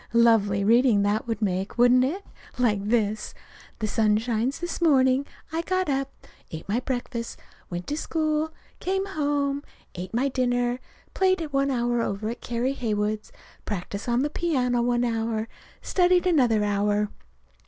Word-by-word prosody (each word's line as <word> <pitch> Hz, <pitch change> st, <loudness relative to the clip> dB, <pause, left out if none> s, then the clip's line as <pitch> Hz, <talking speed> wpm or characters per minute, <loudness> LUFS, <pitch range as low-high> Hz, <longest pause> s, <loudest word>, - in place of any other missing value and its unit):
Lovely 220 Hz, -4 st, +4 dB
reading 230 Hz, -1 st, +4 dB
that 205 Hz, +3 st, 0 dB
would 225 Hz, -1 st, -2 dB
make, 190 Hz, +1 st, -1 dB
wouldn't 245 Hz, +1 st, +6 dB
it? 355 Hz, +10 st, -2 dB, 0.3 s
Like 215 Hz, -5 st, +2 dB
this: 215 Hz, -1 st, 0 dB, 0.4 s
"The 215 Hz, -, -2 dB
sun 210 Hz, 0 st, +2 dB
shines 235 Hz, +3 st, -1 dB
this 345 Hz, 0 st, -5 dB
morning. 270 Hz, -4 st, +4 dB, 0.2 s
I 325 Hz, +1 st, -1 dB
got 370 Hz, 0 st, -1 dB
up, 275 Hz, 0 st, -3 dB, 0.2 s
ate 160 Hz, -, -8 dB
my 215 Hz, +4 st, +1 dB
breakfast, 245 Hz, -2 st, -4 dB, 0.3 s
went 175 Hz, 0 st, -4 dB
to 295 Hz, -, -2 dB
school, 310 Hz, -1 st, -1 dB, 0.3 s
came 385 Hz, +1 st, -1 dB
home, 285 Hz, -5 st, -1 dB, 0.3 s
ate 180 Hz, +1 st, -6 dB
my 245 Hz, +4 st, +1 dB
dinner, 245 Hz, -2 st, 0 dB, 0.3 s
played 375 Hz, -1 st, +2 dB
one 275 Hz, 0 st, +2 dB
hour 240 Hz, -2 st, +1 dB
over 215 Hz, 0 st, -2 dB
to -, -, -1 dB
Carrie 240 Hz, +2 st, -2 dB
Heywood's, 215 Hz, -4 st, -2 dB, 0.3 s
practiced 200 Hz, +2 st, -4 dB
on 240 Hz, +2 st, +2 dB
the 295 Hz, -, -1 dB
piano 255 Hz, -9 st, +1 dB
one 240 Hz, 0 st, +1 dB
hour, 225 Hz, -1 st, -1 dB, 0.4 s
studied 360 Hz, 0 st, +3 dB
another 250 Hz, -11 st, +3 dB
hour. 205 Hz, 0 st, +1 dB
240 Hz, 150 wpm, -25 LUFS, 215-280 Hz, 0.4 s, wouldn't